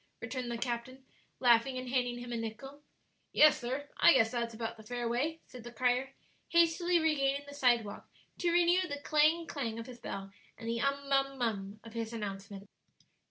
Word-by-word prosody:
returned 255 -3 -4
the 235 - -3
captain, 245 +2 -4 0.3
laughing, 245 +1 +4
and 255 0 -5
handing 245 -1 0
him 245 0 -7
a - - -2
nickel. 230 +6 -6 0.5
"Yes, 305 0 +6
sir; 260 +4 -3
I 345 - +7
guess 225 -4 +4
that's 235 -2 -2
about 230 0 -4
the 220 - -13
fair 240 +2 -4
way," 295 +8 -1
said 250 -2 -11
the 240 - -8
crier, 255 +2 0 0.3
hastily 340 +1 +3
regaining 285 -3 +1
the 285 - -9
sidewalk 240 -7 +1 0.3
to 350 - +1
renew 350 +1 +4
the 285 - -3
clang, 310 +2 +3
clang 240 -8 -4
of 230 - -6
his 245 -1 -11
bell 195 -3 -6 0.3
and 230 - -8
the 230 0 -1
"um 280 0 -1
mum 275 0 +1
mum" 210 -4 -2
of 230 -1 -11
his 230 0 -4
announcement. 200 -2 -6
250 Hz, 185 wpm, -32 LUFS, 230-285 Hz, 0.5 s, I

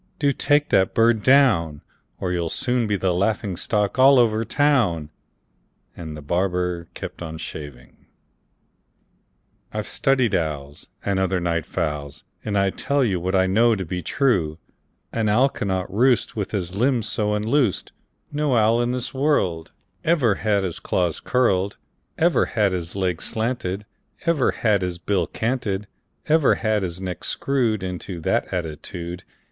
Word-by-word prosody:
Do 145 -1 +2
take 145 +2 +2
that 95 0 +2
bird 115 -1 +4
down, 105 - +3 0.4
Or 90 - -2
you'll 85 -2 -1
soon 125 +3 0
be 105 -1 0
the 95 -1 0
laughing 100 +1 0
stock 105 +5 -1
all 135 +1 +7
over 115 -2 +3
town!" 110 - +1 0.8
And 80 -3 -7
the 75 - -10
barber 90 +1 -1
kept - - -7
on 80 -1 -6
shaving. 75 -6 -9 1.6
"I've 105 -1 -3
studied 130 -6 +1
owls, 75 -4 -3 0.2
And 100 -1 +1
other 95 -1 +1
night 85 -2 -1
fowls, 75 -1 -3 0.2
And 105 -1 -1
I 100 -1 +2
tell 140 +6 0
you 95 -7 0
What 95 +3 -1
I 95 0 +4
know 110 +5 +3
to 95 -2 -4
be 90 +2 -4
true: 90 - +1 0.6
An 110 -2 0
owl 125 +7 +4
cannot 95 -5 -3
roost 125 +3 +2
With 105 -3 -2
his 90 -4 -3
limbs 120 0 +1
so 105 -1 0
unloosed; 110 +1 0 0.4
No 145 -3 +1
owl 115 +1 +4
in 120 +1 0
this 125 -1 -3
world 100 - 0 0.3
Ever 150 -10 +3
had 100 0 0
his 90 -3 -3
claws 90 -3 0
curled, 100 -6 +1 0.4
Ever 170 +1 +3
had 105 -4 +1
his 90 -1 -4
legs 90 -4 -1
slanted, 110 -4 -2 0.4
Ever 165 -6 +2
had 105 -4 +1
his 90 -1 -2
bill 90 0 0
canted, 110 -4 -2 0.4
Ever 155 -2 +4
had 110 -2 0
his 90 -1 -3
neck 90 -2 -5
screwed 120 -7 0
Into 90 -1 -5
that - - 0
attitude. 85 0 -5
100 Hz, 150 wpm, -23 LUFS, 90-120 Hz, 1.6 s, all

